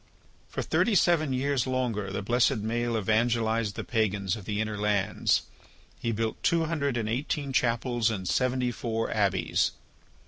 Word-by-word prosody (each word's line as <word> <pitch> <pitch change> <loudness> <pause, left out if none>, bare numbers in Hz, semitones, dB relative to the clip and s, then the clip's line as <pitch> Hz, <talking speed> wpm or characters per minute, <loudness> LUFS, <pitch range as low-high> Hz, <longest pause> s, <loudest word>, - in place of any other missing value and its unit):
For - - -3
thirty 230 - +2
seven 155 -3 +3
years 130 -1 0
longer 120 -6 -1
the 100 +1 -3
blessed 120 -1 +2
Maël 120 +1 0
evangelized 110 0 +1
the - - -4
pagans 105 -3 0
of 105 -4 -9
the 105 +1 -2
inner 110 -1 -1
lands. 105 -2 +1 0.6
He 115 - -1
built 110 0 -2
two 165 -1 +2
hundred 140 -5 -1
and 110 -2 -1
eighteen 140 +4 -2
chapels 120 -1 +1
and 95 -5 -3
seventy 125 +3 +1
four 115 -1 -2
abbeys. 100 -3 +1
115 Hz, 150 wpm, -28 LUFS, 105-130 Hz, 0.6 s, seven